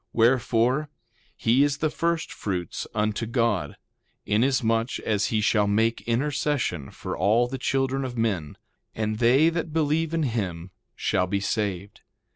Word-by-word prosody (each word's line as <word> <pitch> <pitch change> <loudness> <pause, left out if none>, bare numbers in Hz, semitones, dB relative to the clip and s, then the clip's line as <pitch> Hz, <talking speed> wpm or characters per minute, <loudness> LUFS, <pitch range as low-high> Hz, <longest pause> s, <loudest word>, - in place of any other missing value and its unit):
2:9 110 - -51
Wherefore, 120 +4 +2 0.5
he 120 +5 +3
is 145 0 +1
the 155 -1 0
first 170 0 -1
fruits 90 -4 -4
unto 105 +1 0
God, 115 - 0 0.5
inasmuch 115 0 +1
as 105 -2 0
he 110 -1 0
shall 105 -1 +2
make 110 +3 +1
intercession 130 - -1
for - - -6
all 110 +7 +3
the 130 +1 -5
children 135 +1 0
of 125 -2 -5
men; 100 -10 -1 0.4
and 110 0 -2
they 130 +7 +5
that 165 -1 -3
believe 160 0 +1
in 165 -1 0
him 95 - -3 0.2
shall 90 - 0
be 100 +2 0
saved. 100 -2 -3
115 Hz, 145 wpm, -25 LUFS, 105-135 Hz, 0.5 s, they